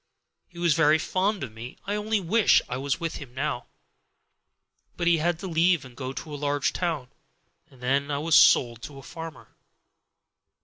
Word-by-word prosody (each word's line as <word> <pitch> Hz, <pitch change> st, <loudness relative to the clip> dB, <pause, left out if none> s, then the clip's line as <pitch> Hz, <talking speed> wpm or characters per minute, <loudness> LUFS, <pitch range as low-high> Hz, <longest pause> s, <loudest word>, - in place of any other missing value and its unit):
He 175 Hz, -, -18 dB
was 170 Hz, -2 st, +3 dB
very 155 Hz, -1 st, +4 dB
fond 190 Hz, +2 st, -1 dB
of 125 Hz, -, -5 dB
me. 115 Hz, +3 st, -9 dB
I 205 Hz, -, -2 dB
only 210 Hz, +1 st, 0 dB
wish 200 Hz, +5 st, +4 dB
I 125 Hz, -, -4 dB
was 140 Hz, +4 st, -2 dB
with 165 Hz, -2 st, -3 dB
him 135 Hz, -4 st, -11 dB
now; 140 Hz, -2 st, -3 dB, 1.3 s
but 175 Hz, -, -2 dB
he 170 Hz, -1 st, +4 dB
had 170 Hz, +1 st, +1 dB
to 195 Hz, -, -5 dB
leave 170 Hz, -2 st, +2 dB
and 125 Hz, -2 st, -13 dB
go 130 Hz, 0 st, -5 dB
to 150 Hz, +3 st, -7 dB
a -, -, -4 dB
large 145 Hz, 0 st, 0 dB
town, 160 Hz, -8 st, -2 dB, 0.6 s
and 130 Hz, -, -20 dB
then 140 Hz, +3 st, +1 dB
I 145 Hz, -, -1 dB
was 160 Hz, +3 st, -1 dB
sold 120 Hz, -5 st, +5 dB
to 140 Hz, +3 st, -9 dB
a 135 Hz, -, -11 dB
farmer. 165 Hz, +1 st, -9 dB
150 Hz, 185 wpm, -26 LUFS, 135-175 Hz, 1.3 s, sold